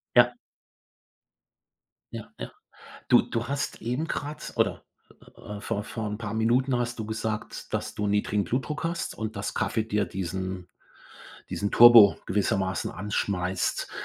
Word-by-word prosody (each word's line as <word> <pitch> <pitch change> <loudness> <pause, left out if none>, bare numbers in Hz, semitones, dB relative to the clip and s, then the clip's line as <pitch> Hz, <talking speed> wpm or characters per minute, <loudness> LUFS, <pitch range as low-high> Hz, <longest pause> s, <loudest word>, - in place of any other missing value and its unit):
Ja. - - +6 1.8
Ja, - - -7
ja. - - -6 0.6
Du - - +7
du 115 0 -3
hast 140 +1 -3
eben 125 +8 -2
grad 150 +1 -5
oder, - - 0 0.5
äh 105 - -8
äh, 100 - -10
vor 105 -3 -2
vor 110 0 -5
'n 105 - -4
paar 110 -2 -5
Minuten 120 +4 +2
hast 120 0 -2
du 110 - -3
gesagt, 110 0 -4
dass - - -3
du 105 - -1
niedrigen 105 0 +1
Blutdruck 135 +7 -3
hast 170 +1 -2
und 110 0 -4
das 100 - -3
Kaffee 110 - 0
dir 105 -2 0
diesen 95 0 -4 0.8
diesen 100 0 -2
Turbo 115 -4 +9
gewissermaßen 95 -1 0
anschmeißt. 95 -1 -2
110 Hz, 140 wpm, -27 LUFS, 100-120 Hz, 1.8 s, Turbo